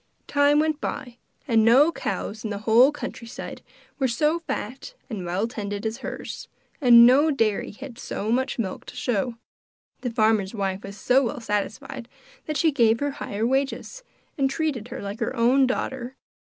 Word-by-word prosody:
Time 285 Hz, 0 st, +3 dB
went 310 Hz, 0 st, +1 dB
by, 250 Hz, -4 st, -5 dB, 0.3 s
and 225 Hz, -4 st, +4 dB
no 265 Hz, +8 st, +6 dB
cows 215 Hz, -8 st, -4 dB
in 220 Hz, -, -3 dB
the 205 Hz, -, -3 dB
whole 240 Hz, +5 st, +6 dB
country 250 Hz, -5 st, -7 dB
side -, -, -8 dB, 0.4 s
were 265 Hz, -, +2 dB
so 300 Hz, +7 st, +1 dB
fat 275 Hz, -, -6 dB, 0.2 s
and 195 Hz, -5 st, -4 dB
well 190 Hz, +6 st, 0 dB
tended 205 Hz, -3 st, -5 dB
as 220 Hz, +1 st, -2 dB
hers, -, -, -6 dB, 0.3 s
and 235 Hz, -3 st, +9 dB
no 275 Hz, +6 st, +5 dB
dairy 225 Hz, -8 st, 0 dB
had 245 Hz, +2 st, -10 dB
so 215 Hz, +3 st, -3 dB
much 260 Hz, +2 st, 0 dB
milk 195 Hz, -6 st, -3 dB
to -, -, -9 dB
show. 240 Hz, 0 st, -1 dB, 0.6 s
The 250 Hz, -, -3 dB
farmer's 215 Hz, -2 st, +1 dB
wife 195 Hz, -2 st, -2 dB
was 200 Hz, 0 st, -9 dB
so 250 Hz, +6 st, +3 dB
well 275 Hz, +3 st, -3 dB
satisfied 230 Hz, +4 st, -4 dB, 0.4 s
that 305 Hz, -1 st, -1 dB
she 320 Hz, -, +3 dB
gave 230 Hz, -5 st, +3 dB
her 285 Hz, 0 st, -1 dB
higher 220 Hz, -5 st, -3 dB
wages, 270 Hz, -, -1 dB, 0.4 s
and 270 Hz, -1 st, +3 dB
treated 275 Hz, -6 st, -2 dB
her 260 Hz, -1 st, -7 dB
like 200 Hz, +2 st, -5 dB
her -, -, -2 dB
own 255 Hz, +3 st, +4 dB
daughter. 255 Hz, 0 st, -3 dB
240 Hz, 175 wpm, -25 LUFS, 220-275 Hz, 0.6 s, and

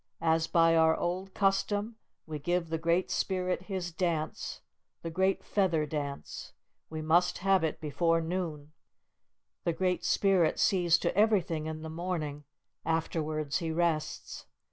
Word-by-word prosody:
As 160 Hz, 0 st, +2 dB
by 165 Hz, -1 st, +4 dB
our 160 Hz, 0 st, +4 dB
old 185 Hz, +2 st, -3 dB
custom, 205 Hz, +3 st, +1 dB, 0.3 s
we 155 Hz, -2 st, -5 dB
give 175 Hz, +2 st, -1 dB
the 160 Hz, 0 st, -1 dB
Great 170 Hz, +3 st, +1 dB
Spirit 185 Hz, -2 st, 0 dB
His 185 Hz, -3 st, -3 dB
dance, 165 Hz, -2 st, -2 dB, 0.4 s
the 165 Hz, -, -4 dB
Great 190 Hz, +3 st, +1 dB
Feather 175 Hz, -6 st, +1 dB
Dance. 145 Hz, -2 st, -5 dB, 0.4 s
We 155 Hz, 0 st, -5 dB
must 175 Hz, +3 st, +3 dB
have 195 Hz, -2 st, +4 dB
it 160 Hz, -, -1 dB
before 165 Hz, +2 st, +1 dB
noon. 160 Hz, -3 st, -3 dB, 0.9 s
The 170 Hz, -, +1 dB
Great 180 Hz, +1 st, 0 dB
Spirit 190 Hz, -5 st, +3 dB
sees 175 Hz, -3 st, +4 dB
to -, -, -1 dB
everything 185 Hz, -7 st, +2 dB
in 155 Hz, 0 st, -5 dB
the -, -, -5 dB
morning, 160 Hz, -3 st, -4 dB, 0.4 s
afterwards 155 Hz, -2 st, -1 dB
he 165 Hz, -2 st, -3 dB
rests. 160 Hz, -1 st, -2 dB
165 Hz, 140 wpm, -30 LUFS, 160-185 Hz, 0.9 s, by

